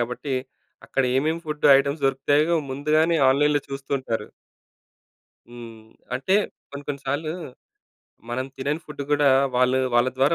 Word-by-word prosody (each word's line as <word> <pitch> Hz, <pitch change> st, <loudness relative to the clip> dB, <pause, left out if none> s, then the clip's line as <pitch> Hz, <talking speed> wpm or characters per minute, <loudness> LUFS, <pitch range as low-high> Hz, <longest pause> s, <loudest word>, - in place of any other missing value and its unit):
కాబట్టీ, 125 Hz, +3 st, -3 dB, 0.5 s
అక్కడ 135 Hz, -, 0 dB
ఏమేమి 155 Hz, +5 st, 0 dB
ఫుడ్డు 150 Hz, -1 st, 0 dB
ఐటెమ్స్ 140 Hz, +2 st, -2 dB
దొరుకుతయో 145 Hz, +5 st, +2 dB, 0.2 s
ముందుగానే 155 Hz, +4 st, +2 dB
ఆన్‌లైన్‌లో 145 Hz, +2 st, +3 dB
చూస్తుంటారు. 135 Hz, -5 st, -3 dB, 1.2 s
హ్మ్. 115 Hz, -2 st, -11 dB, 0.3 s
అంటే, 140 Hz, +10 st, 0 dB, 0.4 s
కొన్ని, 140 Hz, 0 st, -8 dB
కొన్ని 140 Hz, -1 st, -3 dB
సార్లు 155 Hz, +3 st, -2 dB, 1.0 s
మనం 130 Hz, +2 st, -2 dB
తినని 145 Hz, +4 st, -2 dB
ఫుడ్దు 150 Hz, -2 st, -6 dB
గూడా 145 Hz, -1 st, +4 dB, 0.3 s
వాళ్ళు 125 Hz, +1 st, +3 dB, 0.2 s
వాళ్ళ 120 Hz, +1 st, +4 dB
ద్వారా 135 Hz, +5 st, +3 dB
140 Hz, 120 wpm, -24 LUFS, 130-150 Hz, 1.2 s, గూడా